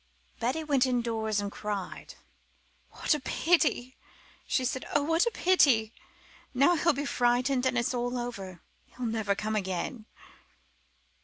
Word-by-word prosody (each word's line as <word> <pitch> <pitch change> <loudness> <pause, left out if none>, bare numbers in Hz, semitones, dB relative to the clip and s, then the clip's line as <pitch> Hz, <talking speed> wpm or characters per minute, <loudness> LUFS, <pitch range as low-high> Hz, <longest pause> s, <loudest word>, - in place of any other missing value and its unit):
Betty 260 +7 -1
went 280 -4 +2
indoors 225 -4 -1
and 200 0 -3
cried. 205 -3 -5 0.7
"What - - 0
a 300 - -1
pity!" 265 -3 +1 0.5
she 260 - +1
said. 260 +1 -2
"Oh, 290 - +3
what 325 +7 +2
a - - +1
pity! 270 - +3 0.6
Now 280 +7 +5
he'll 335 +1 +3
be 285 +1 -3
frightened, 250 +1 +1
and 255 -1 0
it's 235 +2 0
all 245 0 -2
over. 195 -8 -6 0.3
He'll 250 - -5
never 220 -3 0
come 215 +2 -3
again." 205 +4 -3
245 Hz, 140 wpm, -29 LUFS, 220-280 Hz, 0.7 s, Now